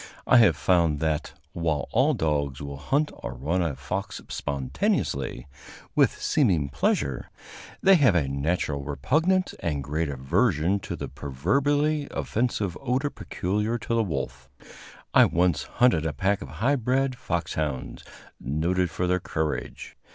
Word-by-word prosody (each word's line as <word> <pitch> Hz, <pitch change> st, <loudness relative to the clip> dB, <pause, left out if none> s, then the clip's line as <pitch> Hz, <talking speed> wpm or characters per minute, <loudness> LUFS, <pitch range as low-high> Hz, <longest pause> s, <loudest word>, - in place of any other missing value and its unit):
I 125 Hz, -, +6 dB
have 115 Hz, -3 st, +6 dB
found 85 Hz, -5 st, +2 dB
that, 80 Hz, -1 st, -1 dB, 0.2 s
while 80 Hz, -3 st, -1 dB
all 135 Hz, +6 st, +3 dB
dogs 70 Hz, -, -1 dB
will 70 Hz, -1 st, -6 dB
hunt 145 Hz, -, 0 dB
or 60 Hz, -, -7 dB
run 80 Hz, +9 st, -1 dB
a 80 Hz, -5 st, -1 dB
fox 65 Hz, -2 st, -4 dB
spontaneously, 65 Hz, -1 st, -2 dB, 0.5 s
with -, -, +3 dB
seeming 90 Hz, -, +2 dB
pleasure, 70 Hz, -1 st, -1 dB, 0.5 s
they 195 Hz, -, +7 dB
have 130 Hz, -, +4 dB
a 75 Hz, -5 st, +2 dB
natural 70 Hz, +1 st, -1 dB
repugnance 160 Hz, -, +1 dB
and 75 Hz, -4 st, -2 dB
great 75 Hz, +3 st, -2 dB
aversion 75 Hz, +7 st, +1 dB
to -, -, -5 dB
the -, -, -5 dB
proverbially 140 Hz, -, 0 dB
offensive 105 Hz, -6 st, -1 dB
odor 135 Hz, +2 st, 0 dB
peculiar 105 Hz, +5 st, -2 dB
to 115 Hz, -, -4 dB
the 115 Hz, -, +3 dB
wolf. 65 Hz, -, -4 dB, 0.6 s
I -, -, +8 dB
once 90 Hz, -1 st, +1 dB
hunted 85 Hz, -11 st, +2 dB
a 75 Hz, -, -2 dB
pack 95 Hz, +7 st, 0 dB
of 70 Hz, -, -7 dB, 0.2 s
high 140 Hz, +2 st, +4 dB
bred 130 Hz, +2 st, 0 dB
foxhounds, 75 Hz, -, -3 dB, 0.4 s
noted 85 Hz, +7 st, 0 dB
for 90 Hz, -, -2 dB
their 90 Hz, +1 st, +1 dB
courage. 80 Hz, -3 st, -4 dB
85 Hz, 140 wpm, -26 LUFS, 70-120 Hz, 0.6 s, I